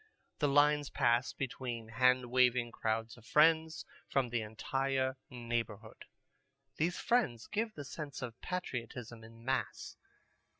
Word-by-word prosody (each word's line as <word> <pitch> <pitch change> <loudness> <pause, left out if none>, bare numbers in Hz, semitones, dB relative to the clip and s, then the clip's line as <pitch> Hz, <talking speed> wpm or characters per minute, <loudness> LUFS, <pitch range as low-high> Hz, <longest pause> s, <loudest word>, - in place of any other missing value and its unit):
The 145 - +3
lines 145 0 +4
pass 120 0 +2
between 125 -3 -4
hand 125 +1 +3
waving 125 -2 +3
crowds 110 +1 -2
of 115 - -16
friends 160 +2 +4 0.2
from 135 -3 +1
the 120 -1 0
entire 130 +4 -1
neighborhood. 115 -3 -4 0.7
These 170 +3 +1
friends 210 - +1
give 220 +1 -2
the 145 - -7
sense 140 0 -6
of 120 -2 -7
patriotism 120 -9 -5
in 115 +1 -14
mass. 135 +1 -2
125 Hz, 125 wpm, -34 LUFS, 115-145 Hz, 0.7 s, lines